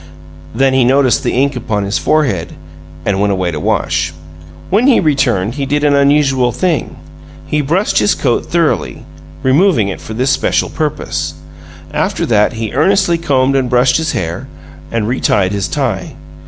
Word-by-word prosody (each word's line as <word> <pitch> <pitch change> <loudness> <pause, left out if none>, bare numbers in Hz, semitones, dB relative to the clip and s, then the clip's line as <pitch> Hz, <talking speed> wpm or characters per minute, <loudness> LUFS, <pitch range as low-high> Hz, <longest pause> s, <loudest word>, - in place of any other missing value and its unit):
Then 135 +2 +2
he 130 -1 +3
noticed 130 0 +3
the - - -1
ink 135 +2 +1
upon 110 -4 -2
his 100 +1 -1
forehead, 125 - 0 0.5
and 100 -1 0
went 100 0 +2
away 90 -2 -1
to 75 - -4
wash. 80 +1 -1 0.6
When 220 +7 +3
he 270 - +5
returned 130 - +1
he 140 0 -3
did 145 +2 0
an 145 -1 +3
unusual 140 -3 +3
thing 165 +5 -1 0.5
he 150 - 0
brushed 170 +9 +1
his 205 - +2
coat 125 -4 -1
thoroughly, 170 -2 -1 0.4
removing 130 - +3
it 95 - -6
for 110 - -8
this 130 +3 +1
special 135 - 0
purpose. 80 - -3 0.6
After - - -1
that, 105 0 +2
he 110 -2 -4
earnestly 175 +4 +2
combed 135 -4 +1
and 130 -2 0
brushed 125 +1 +3
his 160 0 -2
hair, 85 0 -4 0.4
and 115 -2 -1
retied 100 -6 +1
his 100 -4 -2
tie. 80 - -3
130 Hz, 165 wpm, -14 LUFS, 105-150 Hz, 0.6 s, he